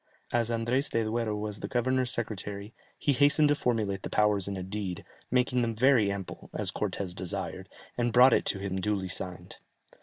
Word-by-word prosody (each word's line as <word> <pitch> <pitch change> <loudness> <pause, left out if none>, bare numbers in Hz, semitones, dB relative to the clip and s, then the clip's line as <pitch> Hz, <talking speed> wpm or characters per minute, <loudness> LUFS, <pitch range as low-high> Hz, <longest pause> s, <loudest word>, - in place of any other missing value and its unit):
As 120 -1 +2
Andrès 120 +4 0
de 115 - +1
Duero 110 -1 -1
was 105 0 -4
the - - -4
governor's 130 +1 +1
secretary, 105 -2 -4 0.2
he 145 - +1
hastened 145 +2 +4
to 145 - +4
formulate 110 -8 -1
the - - -5
powers 105 -2 +2
in 100 -1 -3
a 95 - -4
deed, 95 -2 -5 0.2
making 125 0 +2
them 115 -1 -1
very 120 -4 +4
ample, 100 -2 -7
as - - +3
Cortès 95 -3 -3
desired, 90 -1 -4 0.3
and 120 0 +1
brought 125 +2 +7
it - - +2
to - - 0
him 95 -1 -3
duly 100 -2 -1
signed." 90 -1 -6
110 Hz, 185 wpm, -29 LUFS, 100-125 Hz, 0.3 s, brought